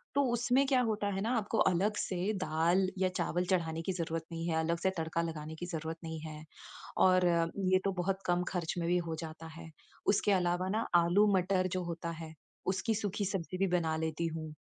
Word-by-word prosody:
तो 280 - +4
उसमें 245 +3 +3
क्या 260 -2 +4
होता 210 -1 -1
है 195 0 -2
ना, 230 +4 0
आपको 220 +1 -1
अलग 190 +4 +3
से 185 +3 -1
दाल 170 +4 +2
या 185 0 +2
चावल 180 0 -1
चढ़ाने 165 -3 0
की 190 - -2
ज़रूरत 165 -2 -3
नहीं 165 0 -3
है, 165 - 0
अलग 165 +1 0
से 190 - +2
तड़का 160 +1 -1
लगाने 160 -1 -4
की 175 - -5
ज़रूरत 160 -2 -4
नहीं 160 -1 -5
है 155 -1 -7 0.5
और 185 -1 +5 0.5
ये 185 - +6
तो 195 - +2
बहुत 195 +1 0
कम 175 0 +2
खर्च 175 -3 -2
में 170 -1 -1
भी 180 - +3
हो 160 - -1
जाता 160 0 -7
है। 165 -1 -9 0.4
उसके 205 0 +3
अलावा 180 0 +1
ना, 220 +3 0
आलू 175 +5 +5
मटर 185 0 +1
जो 180 - -1
होता 170 0 -4
है 160 -1 -8 0.3
उसकी 195 +4 +1
सूखी 205 -1 -2
सब्ज़ी 185 -2 -3
भी 195 +1 +2
बना 160 -2 0
लेती 160 +1 -1
हूँ। 155 -1 -5
175 Hz, 210 wpm, -32 LUFS, 165-195 Hz, 0.5 s, ये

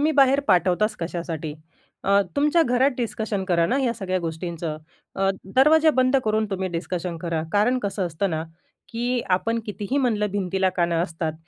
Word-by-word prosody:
बाहेर 275 0 +5
पाठवताच, 185 +3 +2
कशासाठी? 165 -2 -4 0.5
अ, 200 +1 +4
तुमच्या 300 +4 +3
घरात 250 +2 +2
डिस्कशन 220 -4 -2
करा 170 -2 +2
ना 250 +9 +1
या 240 -3 +1
सगळ्या 185 -4 -2
गोष्टींच. 170 0 -5
अ, 160 +4 -4 0.3
दरवाजा 310 +4 +6
बंद 255 +1 +3
करून 215 0 +1
तुम्ही 190 -1 -1
डिस्कशन 175 0 -4
करा. 165 -1 -2
कारण 230 +5 +3
कसं 200 -3 -2
असतं 170 +4 -2
ना? 160 -1 -2 0.5
की 240 +1 -1
आपण 230 +5 0
कितीही 210 +5 -3
म्हणलं, 220 -6 +1
भिंतीला 190 -1 0
कान 175 -2 0
असतात, 165 -1 -1
195 Hz, 155 wpm, -24 LUFS, 170-240 Hz, 0.5 s, दरवाजा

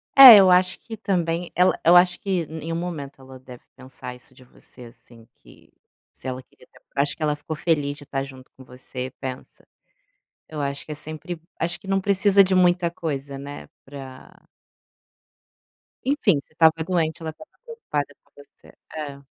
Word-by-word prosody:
É, 260 -5 +13
eu 190 -2 +6
acho 180 +1 +3
que 225 - -8
também, 175 -5 -2
ela 180 +1 +3
eu 170 +2 +6
acho 180 0 +5
que 185 -4 -1
nenhum 160 +1 -6
momento 160 -6 -6
ela 130 0 -13
deve 125 -1 -13
pensar 130 -1 -10
isso 125 +1 -14
de 130 - -17
você, 125 0 -17
assim, 115 -1 -18
que - - -20 0.4
se - - -11
ela 130 0 -4
queria 125 - -23
te - - -66 0.2
acho 140 +1 0
que - - -5
ela 150 -1 +1
ficou 155 +1 -7
feliz 145 -3 -1
de 145 - -13
tá 135 -1 -3
junto 130 -1 -12
com 130 - -14
você, 125 0 -8
pensa. 130 -1 -8 0.8
Eu 155 - -7
acho 140 0 -4
que - - -9
é - - -4
sempre 155 +3 -7 0.2
acho 170 +1 -3
que 195 - -15
não 195 0 +1
precisa 200 0 +4
de 190 0 -1
muita 175 -1 +3
coisa, 140 -5 -5
né, 140 +1 -9 0.2
pra 135 -2 -12 1.6
enfim, 245 - +2
você - - -32
estava 160 0 +5
doente, 165 -2 -1
ela 160 - -4
estava 310 - -16 0.2
preocupada 150 - -4
com 145 - -35
você. 145 -1 -18 0.2
É. 140 -2 -7
155 Hz, 180 wpm, -23 LUFS, 135-180 Hz, 1.6 s, É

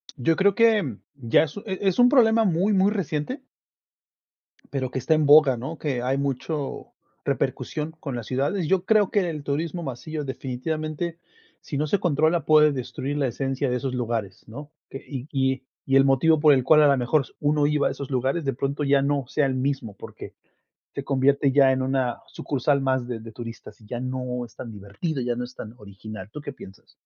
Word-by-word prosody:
Yo 155 +4 +1
creo 200 0 +3
que 210 - +3 0.2
ya, 120 0 +3 0.2
e 195 - -3
e 190 - -3
es 190 - -3
un 245 0 +7
problema 230 -4 +5
muy, 190 +4 +2
muy 195 +1 +3
reciente. 195 - -3 1.3
Pero, 130 -2 -1
que - - -5
está 130 +5 +1
en 155 -2 +2
boga, 145 -3 +7
¿no? 130 +8 -6
Que 135 -5 -2
hay 130 +2 0
mucho 140 +1 -3 0.3
repercusión 155 +1 -2
con 140 -4 -5
las 120 -2 -5
ciudades. 140 - -1
Yo 190 -1 +1
creo 215 -3 +3
que 195 -4 +1
el 155 -3 -5
turismo 160 +5 -2
masivo, 150 +3 -5
definitivamente, 155 +5 -4 0.4
si 140 - -5
no 150 - 0
se 190 +7 +1
controla, 160 0 +2
puede 150 0 +5
destruir 140 +2 -4
la 140 -2 +1
esencia 135 +2 -2
de 125 - 0
esos 125 +1 -3
lugares, 115 -6 -3
¿no? 145 +7 -10 0.2
Que - - -6
y 135 -1 -6
y 130 -1 0 0.2
y 135 - +1
el 135 - +6
motivo 145 +4 +4
por 150 -1 +6
el 130 - +1
cual 155 +3 +6
a 150 - +6
la 140 -1 +4
mejor 130 +4 +2 0.2
uno 145 0 +2
iba 150 -1 +2
a - - -1
esos 140 -1 -7
lugares, 135 +4 -1
de 135 - 0
pronto 140 +3 -2
ya 140 -1 +3
no 140 -2 0
sea 145 +1 +1
el 135 - 0
mismo 130 -5 -2
porque - - -10 0.6
se 140 - -4
convierte 140 +1 +2
ya 135 -1 +5
en 130 0 0
una 130 -2 -1
sucursal 140 0 -1
más 130 -2 0
de 120 -2 -4
de 115 0 -10
turistas, 115 0 -9
y - - -16
ya 120 +3 -5
no 125 -1 -3
es 115 -3 -12
tan 115 - -8
divertido, 105 - -4
ya 120 -1 -1
no 125 - -3
es 125 +1 -9
tan 110 +2 -9
original, 105 0 -10
¿tú 150 - -7
qué 145 - -6
piensas? 95 -7 -14
140 Hz, 205 wpm, -24 LUFS, 125-155 Hz, 1.3 s, un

